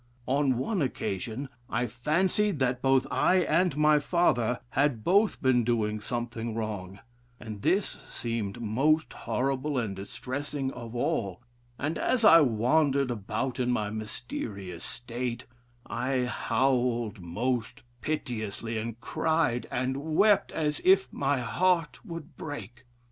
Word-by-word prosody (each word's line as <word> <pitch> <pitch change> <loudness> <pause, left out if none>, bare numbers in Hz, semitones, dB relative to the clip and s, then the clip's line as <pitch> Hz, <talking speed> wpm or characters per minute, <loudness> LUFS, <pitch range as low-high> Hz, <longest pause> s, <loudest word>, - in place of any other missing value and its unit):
On 135 -1 +2
one 185 - -1
occasion 125 0 -2 0.2
I 125 - 0
fancied 170 - +1
that 125 -2 0
both 135 0 +3
I - - +3
and 170 -1 +2
my 150 0 +5
father 135 -7 +2
had 135 -5 +1
both 200 - +3
been 125 -2 +4
doing 110 -2 0
something 120 0 -3
wrong, 100 -4 -4 0.4
and 110 -3 -7
this 195 - +3 0.2
seemed 115 -3 -3
most 135 +8 +1
horrible 135 +2 -1
and 110 -5 -1
distressing 135 +7 -4
of 120 -2 -8
all; 100 -3 -1 0.3
and 150 +4 -2
as 240 -3 +2
I 165 -5 +9
wandered 135 +2 +2
about 115 +4 -3
in 125 -1 +1
my 105 -4 0
mysterious 105 -4 -5
state, 120 0 -4 0.4
I 125 +1 -1
howled 125 -4 0
most 115 +7 -2 0.2
piteously, 115 -6 -3
and 115 +1 -5
cried 160 -7 0
and 130 +2 -1 0.2
wept 205 +1 +4
as 150 -2 -1
if 190 +1 +4
my 140 -1 0
heart 170 +4 +1
would 170 -7 -8
break. 120 -5 -7
125 Hz, 125 wpm, -28 LUFS, 115-150 Hz, 0.4 s, I